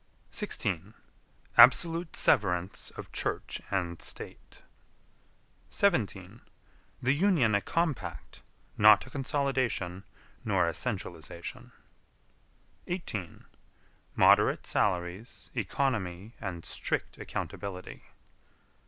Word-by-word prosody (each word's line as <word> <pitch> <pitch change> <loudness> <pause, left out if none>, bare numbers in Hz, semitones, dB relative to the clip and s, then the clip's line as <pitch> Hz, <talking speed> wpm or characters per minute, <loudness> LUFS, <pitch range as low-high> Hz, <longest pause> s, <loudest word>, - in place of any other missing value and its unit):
16. 90 +6 -3 0.6
Absolute 165 0 +6
severance 90 -1 +1
of - - -8
Church - - -3
and 85 -4 -2
State. - - -10 1.1
17. 110 - 0 0.6
The 130 +2 +4
Union 150 - +3
a 100 - +3
compact 165 -1 -2 0.4
not 105 0 +8
a 130 - -13
consolidation 130 - -1 0.4
nor 85 - +2
a 85 - 0
centralization. 85 -7 -5 1.2
18. 110 - -5 0.7
Moderate - - +5
salaries, 90 +5 -1
economy 105 -4 -1
and 90 -5 -5
strict - - -3
accountability. 95 -2 -6
105 Hz, 80 wpm, -30 LUFS, 90-135 Hz, 1.2 s, not